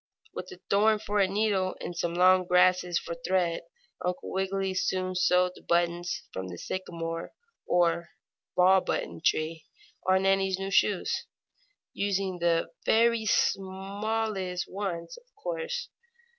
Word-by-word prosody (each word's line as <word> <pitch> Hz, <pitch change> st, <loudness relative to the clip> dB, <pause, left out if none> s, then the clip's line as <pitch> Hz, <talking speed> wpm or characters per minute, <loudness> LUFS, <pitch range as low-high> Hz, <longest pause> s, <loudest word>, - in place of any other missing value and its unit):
With -, -, -7 dB
a 375 Hz, -, -11 dB
thorn 215 Hz, +2 st, +4 dB
for 210 Hz, -1 st, -2 dB
a 195 Hz, -, +4 dB
needle, 195 Hz, -2 st, 0 dB
and 175 Hz, -, -6 dB
some 170 Hz, 0 st, -2 dB
long 185 Hz, 0 st, +5 dB
grasses 180 Hz, -1 st, +4 dB
for 170 Hz, -, -4 dB
thread, 170 Hz, 0 st, 0 dB, 0.4 s
Uncle 180 Hz, 0 st, -3 dB
Wiggily 190 Hz, 0 st, -1 dB
soon 185 Hz, 0 st, -1 dB
sewed 180 Hz, 0 st, +3 dB
the -, -, -15 dB
buttons 175 Hz, +1 st, 0 dB
from 95 Hz, 0 st, -4 dB
the 90 Hz, -1 st, -7 dB
sycamore, 165 Hz, -, -5 dB, 0.3 s
or 170 Hz, -1 st, +2 dB, 0.5 s
button 185 Hz, +1 st, +5 dB, 0.3 s
ball, -, -, -10 dB
tree 160 Hz, -1 st, 0 dB, 0.4 s
on 190 Hz, 0 st, +4 dB
Nannie's 195 Hz, -1 st, +2 dB
new 195 Hz, 0 st, -4 dB
shoes, 195 Hz, +1 st, +1 dB, 0.7 s
using 195 Hz, -2 st, -1 dB
the 170 Hz, -1 st, +1 dB
very 230 Hz, 0 st, +3 dB
smallest 195 Hz, -1 st, -1 dB
ones, 180 Hz, -4 st, -4 dB
of 485 Hz, -, -31 dB
course. 485 Hz, +2 st, -4 dB
185 Hz, 130 wpm, -28 LUFS, 175-200 Hz, 0.7 s, long